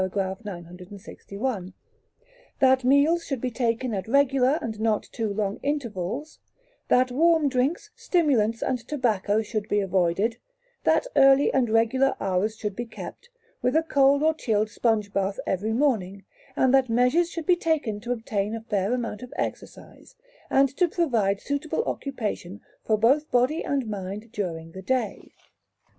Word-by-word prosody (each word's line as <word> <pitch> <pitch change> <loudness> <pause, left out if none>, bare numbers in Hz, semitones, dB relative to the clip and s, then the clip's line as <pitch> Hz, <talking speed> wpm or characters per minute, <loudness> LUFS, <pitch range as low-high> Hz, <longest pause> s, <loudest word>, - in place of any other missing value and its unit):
961); 190 +2 -5 0.9
that 260 -1 +4
meals 285 +6 +4
should 270 -5 -3
be 250 +1 -3
taken 235 0 -1
at 195 0 -3
regular 270 +2 +3
and 220 -2 -5
not 220 -1 +1
too 220 -3 -4
long 200 0 -2
intervals; 265 - -3 0.5
that 255 0 +3
warm 320 +2 +3
drinks, 275 +10 -1
stimulants, 245 - +1
and 255 -1 -1
tobacco 220 -6 0
should 215 -1 -4
be 205 - +2
avoided; 195 +3 +1 0.5
that - - +3
early 270 +1 +5
and 255 -4 +2
regular 230 +5 +2
hours 195 +4 -1
should 210 -3 -4
be 240 - -3
kept, 485 - -10 0.3
with 250 - +1
a 320 - +4
cold 280 -2 +3
or 315 0 +4
chilled 215 -7 -1
sponge 215 -4 0
bath 195 0 -1
every 205 +4 -1
morning; 215 -7 0 0.3
and 260 0 +3
that 265 -2 +4
measures 250 +9 +3
should 335 -2 -6
be 360 - +4
taken 310 -11 -1
to 240 +3 -5
obtain 220 -3 -2
a 225 - -6
fair 210 -1 -1
amount 235 -3 -4
of 250 - -9
exercise, - - -7 0.3
and 275 -1 +3
to 360 - +3
provide 230 - 0
suitable 285 +9 -2
occupation 215 - -4 0.2
for 215 - +1
both 275 +8 +3
body 250 +6 +1
and 275 -4 -1
mind 205 +2 -6
during 165 -7 -4
the 190 - -9
day. 255 +5 -2
235 Hz, 150 wpm, -25 LUFS, 205-275 Hz, 0.9 s, early